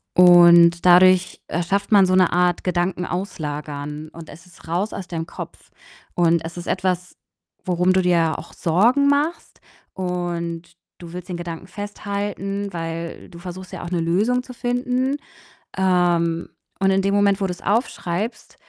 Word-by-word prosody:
Und 175 -1 +7
dadurch, 185 +1 +5
äh, 170 +2 -2
schafft 195 +5 -1
man 200 -2 +6
so 185 - 0
'ne 185 -2 +4
Art 180 0 +1
Gedanken 180 0 -1
auslagern, 150 -5 -5
und 165 -1 -11
es 165 +3 -13
ist 175 -2 -18
raus 180 +6 -2
aus 195 -3 -6
deinem 165 -2 -4
Kopf, - - -10 0.4
und 170 -1 +2
es 170 - -7
ist 175 - -7
etwas, 180 -1 -2 0.5
worum 180 0 +2
du 190 - +3
dir 170 -3 +2
auch 170 - -12
Sorgen 235 - +2
machst, 290 +4 -1 0.3
und 175 -2 -4 0.2
du 170 -1 -11
willst 180 +1 -8
den 180 - -4
Gedanken 170 +1 -7
festhalten, 200 0 -4
weil 165 0 -6
du 170 - -12
versuchst 185 +1 -9
ja - - -7
auch - - -5
'ne 175 -2 0
Lösung 210 +10 +1
zu 250 - -11
finden. 250 +2 -1 0.6
Ähm, 175 -3 +1 0.3
und 195 0 +2
in 195 0 +2
dem 195 +1 0
Moment, 200 0 +2
wo 195 - +1
du's 180 -1 -6
aufschreibst, 205 -1 -2
180 Hz, 160 wpm, -21 LUFS, 170-195 Hz, 0.6 s, Und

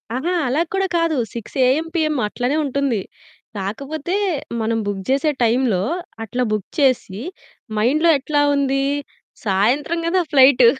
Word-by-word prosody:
అహా! 335 +8 -1
అలా 285 +7 +1
కూడా 385 0 +1
కాదు. 330 -3 +1 0.2
6 230 +2 -8
ఏఎం, 305 +6 +2
పీఎం 310 -2 +1
అట్లనే 245 +6 -1
ఉంటుంది. 270 -6 0 0.6
కాకపోతే 280 - -3 0.5
మనం 225 +1 0
బుక్ 195 -2 -3
జేసే 280 +3 +2
టైంలో 230 -5 +2 0.4
అట్లా 245 +3 -2
బుక్ 210 -3 -2
చేసి, 240 -7 +1 0.6
మైండ్‌లో 300 +10 +3
ఎట్లా 290 +2 0
ఉంది? 275 -1 +1 0.6
సాయంత్రం 250 - +1
గదా 365 +1 +2
ఫ్లైట్. 265 -3 +6
270 Hz, 130 wpm, -20 LUFS, 230-305 Hz, 0.6 s, ఫ్లైట్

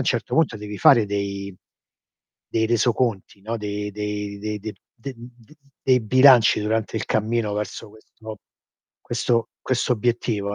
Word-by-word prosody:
'n 130 - -2
certo 120 -2 -1
punto 155 -8 +2
devi 105 -1 -7
fare 135 -8 +6
dei 100 -1 -4 0.9
dei 110 0 0
resoconti, 115 -3 0
no, 115 +2 -3
de 105 0 -4
dei 105 -1 -4
de 105 +1 -4
d 110 +1 -6 0.2
d 130 +2 -8 0.7
dei 130 -1 +3
bilanci 125 -1 +6
durante 110 +1 -1
il - - -2
cammino 110 0 0
verso 105 0 -5
questo 110 0 -12 0.6
questo 115 -1 -1
questo 130 0 0
obiettivo, 110 -3 -1
110 Hz, 135 wpm, -23 LUFS, 105-120 Hz, 0.9 s, fare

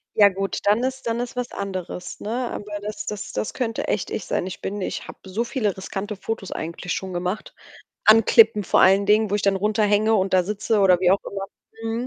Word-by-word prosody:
Ja 205 -2 +7
gut, 195 +1 -3
dann 210 +4 +3
ist 260 -1 -3
dann 230 +1 -1
ist 245 0 -4
was 250 -1 -3
anderes, 185 -2 -5
ne? 210 - -6 0.2
Aber 205 0 -5
das 210 +1 -6
das 210 -1 -5
das - - -3
könnte 230 -3 -2
echt - - -1
ich - - -3
sein. - - -1
Ich 185 - -7
bin 205 +1 -4
ich 185 - -4
habe - - -10
so 195 +5 -2
viele 230 -5 -1
riskante 195 +2 -5
Fotos 200 0 -5
eigentlich 170 +2 -4
schon 190 -1 -4
gemacht. 180 +4 -4 0.5
An 220 +1 +7
Klippen 220 -2 +5
vor - - +3
allen 195 +2 +5
Dingen, 210 +1 +3
wo - - +1
ich 205 - 0
dann 200 -1 +3
runterhänge 210 +1 +2
und 195 -2 +1
da 185 -1 +5
sitze 210 +3 -1
oder 185 -2 +5
wie 180 -1 +4
auch 195 - +3
immer. 195 -1 -4 0.4
Mhm. 225 +2 -2
205 Hz, 225 wpm, -23 LUFS, 190-220 Hz, 0.5 s, Ja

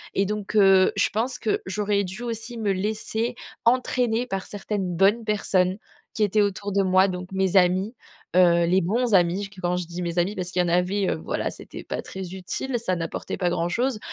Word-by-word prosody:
et 195 - +2
donc, 210 +1 -4
heu, 195 -2 +6
je - - +2
pense 245 +4 -2
que 220 - 0
j'aurais 200 +1 0
dû 190 +6 -7
aussi 230 0 -5
me 210 -3 0
laisser 220 +4 -2 0.3
entraîner 245 -1 +2
par 195 -5 -4
certaines 195 -3 -3
bonnes 205 +5 +3
personnes 190 -3 +1 0.4
qui 215 - 0
étaient 210 +1 +3
autour 200 0 -1
de 200 - +2
moi, 185 0 +4
donc 180 0 -5
mes 190 0 +1
amis, 185 +4 +3 0.4
heu, 170 -2 +5
les 185 +3 +3
bons 225 +6 0
amis, 180 +1 +3
j 200 - -6
qu 195 -1 -13
quand 180 0 0
je 180 - -3
dis 175 +1 -6
mes 170 0 -3
amis 190 +5 0
parce 180 -1 -2
qu'il 180 - -1
y - - -1
en - - -2
avait, 180 +3 +1
heu, - - 0
voilà, - - -2
c'était - - -10
pas - - -4
très 190 -2 -7
utile, 240 +7 -3
ça 185 -5 -1
n'apportait 165 -1 -4
pas 180 -2 0
grand 170 0 -1
chose. 240 +3 0
195 Hz, 215 wpm, -24 LUFS, 180-215 Hz, 0.4 s, heu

